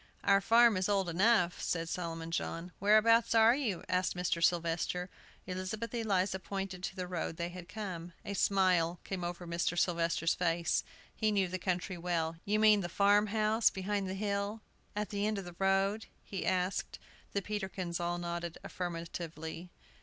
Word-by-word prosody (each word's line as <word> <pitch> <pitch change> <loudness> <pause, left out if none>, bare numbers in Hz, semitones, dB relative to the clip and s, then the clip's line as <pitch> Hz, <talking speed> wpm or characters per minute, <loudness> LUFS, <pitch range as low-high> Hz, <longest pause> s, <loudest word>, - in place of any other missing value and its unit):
"Our 195 0 +5
farm 230 0 +5
is 185 +2 0
old 195 -3 +1
enough," 180 0 +3
said 165 -1 -1
Solomon 165 -1 -4
John. 165 +1 -3
"Whereabouts 225 +3 +5
are 225 +2 +7
you?" 230 -11 -2
asked 185 0 0
Mr. 175 -1 -1
Sylvester. 175 +1 +1 0.3
Elizabeth 185 +6 -4
Eliza 195 -5 0
pointed 195 -1 -5
to - - -5
the 185 -2 -3
road 175 -2 -4
they 170 0 -2
had 175 -1 -10
come. 180 -5 -6
A 200 - -3
smile 185 -4 +2
came 190 -2 -4
over 175 +1 -4
Mr. 170 +1 -1
Sylvester's 170 -1 +1
face; 170 -1 +1 0.3
he 215 -1 +1
knew 195 -3 +2
the 185 +1 -4
country 180 0 -2
well. 165 -2 -1
"You 210 +1 +2
mean 215 -1 +6
the 175 - -4
farm 205 +3 +4
house 215 +1 +3
behind 195 0 -2
the 190 - -3
hill, 200 +2 -2 0.3
at 210 0 -2
the 205 0 -1
end 215 -1 -1
of 195 - -5
the 175 -1 -9
road?" 195 +3 +1 0.2
he 195 - -4
asked. 185 0 0 0.4
The 200 - -1
Peterkins 190 -4 -3
all 175 0 -1
nodded 170 -1 -4
affirmatively. 165 -1 -5
185 Hz, 170 wpm, -33 LUFS, 175-205 Hz, 0.4 s, are